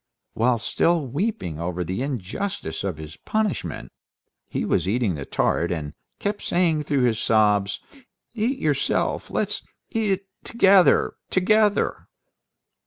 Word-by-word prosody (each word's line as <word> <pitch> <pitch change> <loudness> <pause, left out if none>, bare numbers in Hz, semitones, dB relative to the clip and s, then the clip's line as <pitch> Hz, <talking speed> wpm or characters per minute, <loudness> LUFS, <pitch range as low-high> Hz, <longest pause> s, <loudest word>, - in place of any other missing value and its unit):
While 120 +1 +2
still 165 +7 +1
weeping 130 - -2
over 90 +1 -2
the 95 +6 -3
injustice 140 - -3
of 95 -6 -2
his 75 0 -9
punishment, 215 -3 -2 0.6
he - - -2
was - - +1
eating 110 -1 +1
the 70 -3 -5
tart, 85 - 0
and 75 -4 -3 0.2
kept 205 0 -2
saying 170 -3 +1
through 140 -3 0
his 115 -3 +2
sobs, 105 -3 +2 0.5
"Eat 245 +4 0
yourself; 145 - 0
let's - - -1 0.3
eat 225 -4 0
it 195 +1 -5 0.2
together... 195 -5 +4
together." 210 +2 +2
135 Hz, 125 wpm, -24 LUFS, -, 0.6 s, together